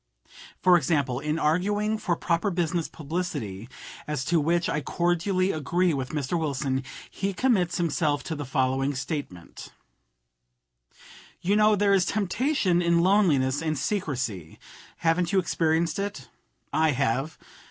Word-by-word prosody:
For 180 Hz, -1 st, +7 dB
example, 140 Hz, -5 st, 0 dB
in 150 Hz, +2 st, -2 dB
arguing 205 Hz, +7 st, +1 dB
for 175 Hz, -5 st, 0 dB
proper 170 Hz, +4 st, 0 dB
business 175 Hz, -2 st, -1 dB
publicity, 145 Hz, -, -5 dB, 0.4 s
as 150 Hz, -3 st, -2 dB
to 170 Hz, +3 st, +2 dB
which 170 Hz, +3 st, +1 dB
I 150 Hz, -, -1 dB
cordially 175 Hz, +4 st, 0 dB
agree 170 Hz, +4 st, 0 dB
with 130 Hz, -2 st, -3 dB
Mr. 150 Hz, +3 st, -2 dB
Wilson, 135 Hz, -3 st, -1 dB, 0.3 s
he 195 Hz, +1 st, -2 dB
commits 195 Hz, -9 st, +1 dB
himself 155 Hz, -4 st, 0 dB
to 160 Hz, -, -4 dB
the 145 Hz, -, -4 dB
following 135 Hz, +1 st, 0 dB
statement: 135 Hz, -, -6 dB, 1.7 s
"You 195 Hz, +4 st, +1 dB
know 215 Hz, 0 st, +5 dB
there 200 Hz, 0 st, +3 dB
is 190 Hz, -3 st, +3 dB
temptation 205 Hz, -, +1 dB
in 170 Hz, -1 st, +3 dB
loneliness 165 Hz, -9 st, +3 dB
and 155 Hz, -2 st, -1 dB
secrecy. 125 Hz, -, -3 dB, 0.4 s
Haven't 170 Hz, +1 st, +1 dB
you 195 Hz, -, +2 dB
experienced 165 Hz, -1 st, +1 dB
it? 200 Hz, +1 st, -5 dB, 0.4 s
I 155 Hz, -1 st, +3 dB
have. 135 Hz, +6 st, -1 dB
165 Hz, 130 wpm, -26 LUFS, 145-185 Hz, 1.7 s, For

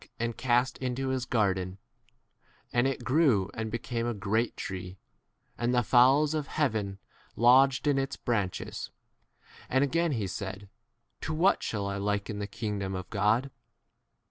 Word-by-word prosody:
and 115 Hz, 0 st, -1 dB
cast 125 Hz, 0 st, +1 dB
into 130 Hz, +1 st, -2 dB
his 130 Hz, -1 st, -2 dB
garden; 95 Hz, -5 st, 0 dB, 1.0 s
and 120 Hz, +2 st, +3 dB
it 135 Hz, -2 st, -3 dB
grew 130 Hz, -, +3 dB
and 110 Hz, -1 st, -3 dB
became 120 Hz, +1 st, -3 dB
a 120 Hz, -, -2 dB
great 110 Hz, +4 st, -1 dB
tree, 95 Hz, 0 st, -6 dB, 0.6 s
and 120 Hz, +1 st, +1 dB
the 120 Hz, -, +3 dB
fowls 135 Hz, +6 st, +5 dB
of 150 Hz, -2 st, -2 dB
heaven 110 Hz, -10 st, -1 dB, 0.4 s
lodged 130 Hz, +4 st, +5 dB
in 145 Hz, -2 st, +3 dB
its 135 Hz, +1 st, -2 dB
20 -, -, -41 dB
branches. 105 Hz, -7 st, -2 dB, 0.8 s
And 130 Hz, +2 st, +3 dB
again 165 Hz, +3 st, +1 dB
he 110 Hz, -5 st, -1 dB
said, 95 Hz, +1 st, -5 dB, 0.5 s
To 155 Hz, -, -3 dB
what 185 Hz, +5 st, +3 dB
shall 105 Hz, -3 st, -2 dB
I 100 Hz, 0 st, -2 dB
liken 105 Hz, +1 st, -2 dB
the 100 Hz, -, -3 dB
kingdom 105 Hz, -3 st, -3 dB
21 95 Hz, -, -2 dB
of 95 Hz, -, -10 dB
God 110 Hz, +6 st, +1 dB
115 Hz, 155 wpm, -29 LUFS, 100-130 Hz, 1.0 s, fowls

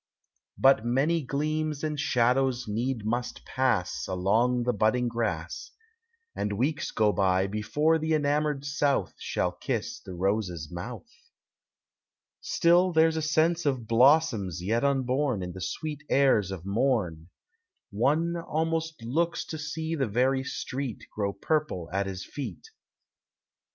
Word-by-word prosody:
But 135 Hz, -4 st, +5 dB
many 140 Hz, +8 st, +1 dB
gleams 150 Hz, +2 st, -2 dB
and 150 Hz, -1 st, -2 dB
shadows 125 Hz, -1 st, +2 dB
need 115 Hz, +1 st, -2 dB
must 120 Hz, +3 st, -3 dB
pass 125 Hz, -9 st, 0 dB
Along 110 Hz, +7 st, +1 dB
the 125 Hz, +1 st, +1 dB
budding 110 Hz, +4 st, +2 dB
grass, 115 Hz, -, -3 dB, 0.7 s
And 105 Hz, -, -2 dB
weeks 145 Hz, +9 st, -1 dB
go 105 Hz, -2 st, +2 dB
by, 95 Hz, 0 st, +2 dB
before 145 Hz, +11 st, +1 dB
the 160 Hz, 0 st, +1 dB
enamored 145 Hz, -1 st, 0 dB
South 145 Hz, -1 st, 0 dB
Shall -, -, -1 dB
kiss -, -, -3 dB
the 95 Hz, -, -9 dB
rose's 90 Hz, -4 st, -1 dB
mouth. 110 Hz, -, -7 dB, 1.3 s
Still 175 Hz, +2 st, +3 dB
there 160 Hz, 0 st, +4 dB
's -, -, -6 dB
a 160 Hz, -, -1 dB
sense 160 Hz, +2 st, +2 dB
of 130 Hz, -5 st, 0 dB
blossoms 115 Hz, -, +3 dB
yet 115 Hz, +6 st, 0 dB
unborn 130 Hz, -4 st, +1 dB
In 90 Hz, -, -5 dB
the 95 Hz, -, -9 dB
sweet 145 Hz, -, -4 dB
airs 130 Hz, -8 st, +3 dB
of 95 Hz, -3 st, -6 dB
morn; 100 Hz, -7 st, 0 dB, 0.6 s
One 150 Hz, +11 st, +1 dB
almost 160 Hz, -3 st, -2 dB
looks 165 Hz, +9 st, 0 dB
to 160 Hz, -, -6 dB
see 160 Hz, +2 st, -3 dB
the 135 Hz, -6 st, 0 dB
very 130 Hz, +5 st, +1 dB
street 130 Hz, -3 st, -5 dB
Grow 100 Hz, -2 st, -1 dB
purple 100 Hz, -, -2 dB
at 100 Hz, 0 st, 0 dB
his 95 Hz, -1 st, -5 dB
feet. 145 Hz, -, -7 dB
130 Hz, 135 wpm, -28 LUFS, 105-150 Hz, 1.3 s, But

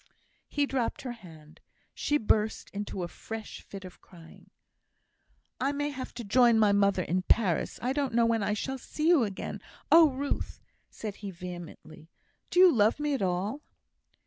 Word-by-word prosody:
He 290 Hz, 0 st, 0 dB
dropped 260 Hz, -4 st, -2 dB
her 255 Hz, -, -4 dB
hand. 160 Hz, -9 st, -14 dB, 0.3 s
She 295 Hz, -, +1 dB
burst 215 Hz, -2 st, 0 dB
into 200 Hz, -2 st, -4 dB
a -, -, -3 dB
fresh 225 Hz, +5 st, -8 dB
fit 195 Hz, -1 st, -10 dB
of 185 Hz, -, -12 dB
crying. 165 Hz, -3 st, -16 dB, 1.1 s
"I 270 Hz, +3 st, +1 dB
may 290 Hz, +1 st, -2 dB
have 260 Hz, -2 st, -6 dB
to 240 Hz, -, -5 dB
join 235 Hz, +2 st, +4 dB
my 210 Hz, -2 st, +5 dB
mother 200 Hz, -2 st, +3 dB
in 180 Hz, +3 st, 0 dB
Paris; 185 Hz, -3 st, +1 dB
I 255 Hz, +2 st, +1 dB
don't 275 Hz, -4 st, -1 dB
know 235 Hz, -1 st, +4 dB
when 230 Hz, -1 st, +1 dB
I 205 Hz, +1 st, 0 dB
shall 265 Hz, +5 st, -4 dB
see 305 Hz, +5 st, -3 dB
you 335 Hz, -8 st, +5 dB
again. 195 Hz, -2 st, -6 dB, 0.3 s
Oh, 325 Hz, -1 st, +8 dB
Ruth!" 280 Hz, +2 st, -3 dB, 0.3 s
said 210 Hz, -2 st, -7 dB
he, 205 Hz, -, -6 dB
vehemently, 175 Hz, -3 st, -10 dB, 0.4 s
"do 355 Hz, -, +1 dB
you 370 Hz, -2 st, +8 dB
love 220 Hz, +2 st, +3 dB
me 295 Hz, -1 st, 0 dB
at 270 Hz, -, -1 dB
all?" 190 Hz, +9 st, -1 dB
220 Hz, 175 wpm, -29 LUFS, 190-265 Hz, 1.1 s, Oh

